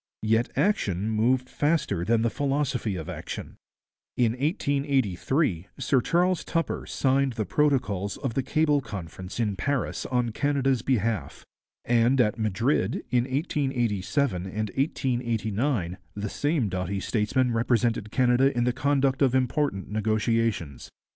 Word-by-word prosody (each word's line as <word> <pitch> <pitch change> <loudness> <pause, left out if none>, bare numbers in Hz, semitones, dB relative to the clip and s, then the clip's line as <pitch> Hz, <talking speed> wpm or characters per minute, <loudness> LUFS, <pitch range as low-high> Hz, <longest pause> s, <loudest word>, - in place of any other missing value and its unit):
Yet 115 +2 +2
action 110 - +1
moved 125 +4 +2
faster 145 - 0
than 115 +4 +2
the 115 - +1
philosophy 135 -6 -1
of 80 -3 -6
action. - - -7 0.6
In 120 -3 +3
1883 135 - 0
Sir 135 -3 +2
Charles 180 +5 +1
Tupper 165 -1 -2
signed 135 -1 +1
the 110 -2 -2
protocols 105 -10 0
of 130 -4 -3
the 135 - +1
Cable 150 +1 +2
Conference 95 -3 -7
in 105 -4 0
Paris 140 +6 -2
on 125 -2 0
Canada's 135 0 +1
behalf; 110 - -1 0.4
and 120 +2 +3
at 110 -2 +2
Madrid, 110 +1 0
in 125 -1 +3
1887 130 - -1
and 105 +2 -3
1889, 120 - -1 0.2
the 105 0 -3
same 145 -3 0
doughty 95 +1 -2
statesman 120 +5 0
represented 115 -2 +1
Canada 125 +3 +3
in 120 - +3
the 125 0 +1
conduct 135 0 +1
of 130 -2 +3
important 130 -6 0
negotiations. 110 - 0
120 Hz, 130 wpm, -26 LUFS, 105-135 Hz, 0.6 s, In